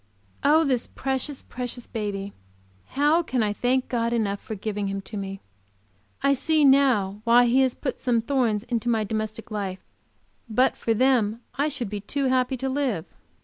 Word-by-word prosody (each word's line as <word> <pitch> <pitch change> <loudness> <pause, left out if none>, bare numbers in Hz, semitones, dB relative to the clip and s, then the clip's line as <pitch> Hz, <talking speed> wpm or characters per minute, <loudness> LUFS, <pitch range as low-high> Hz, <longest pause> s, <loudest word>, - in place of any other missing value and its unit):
Oh, 310 +3 +5
this 255 -5 0
precious, 270 +1 -3
precious 245 -1 -5
baby! 200 -2 -4 0.6
How 300 +4 +4
can 255 -8 -1
I 205 -1 0
thank 250 +4 0
God 235 -1 0
enough 205 -4 0
for 220 - -6
giving 205 0 -3
him 195 0 -3
to 210 - -10
me! 195 -1 -5 0.8
I 280 - +4
see 305 +3 +2
now 245 -8 +3
why 240 +1 +6
He 245 +3 +4
has 260 -2 +2
put 265 - -4
some 240 -2 +1
thorns 230 -4 0
into 240 -1 -2
my 225 -2 +2
domestic 215 +2 -4
life; 195 -3 -4 0.6
but 250 +4 +3
for 225 - 0
them 235 -3 +2
I 285 +3 0
should 260 -6 -3
be 210 - -3
too 275 +7 -2
happy 255 0 +1
to 265 +2 -2
live. 260 - -1
240 Hz, 175 wpm, -25 LUFS, 210-265 Hz, 0.8 s, why